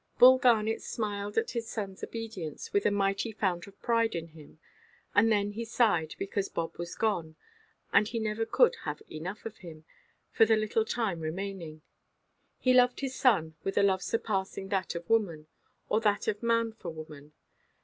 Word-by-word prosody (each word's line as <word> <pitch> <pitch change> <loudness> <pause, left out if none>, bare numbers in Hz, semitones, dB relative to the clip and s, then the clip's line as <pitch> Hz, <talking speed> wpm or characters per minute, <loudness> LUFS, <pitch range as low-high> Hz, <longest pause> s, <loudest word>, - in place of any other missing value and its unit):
Bull 255 +1 +8
Garnet 225 -3 +3
smiled 205 -2 -4
at 225 - +1
his 230 -2 -3
sonʼs 195 -4 -5
obedience, 215 -9 -6
with 200 - +3
a - - +5
mighty 200 +2 0
fount 190 -5 -1
of 200 - -16
pride 230 -3 +2
in 165 0 -4
him; 155 -1 -15 0.6
and 225 +2 +5
then 205 -1 +2
he 225 +3 -4
sighed, 215 -9 +1
because 195 0 -2
Bob 165 -1 -3
was 170 0 -5
gone—and 215 - -2
he 230 - -4
never 220 0 -1
could 475 - +3
have 150 0 -4
enough 180 +7 -6
of 225 -1 -6
him, 160 -3 -11 0.5
for - - +5
the 220 0 +4
little 215 +1 +1
time 220 -8 -1
remaining. 165 -1 -5 0.7
He 255 - +3
loved 250 +1 +4
his 270 -1 -2
son 195 -13 +2
with 195 - -3
a 205 - +5
love 190 -1 +3
surpassing 195 -3 -2
that 190 -3 -1
of 170 0 -6
woman, 180 -9 +1 0.4
or 215 - +1
that 210 -2 +1
of 210 -1 -1
man 230 -1 +2
for 200 -6 -7
woman. 155 -2 -10
205 Hz, 175 wpm, -30 LUFS, 170-225 Hz, 0.7 s, Bull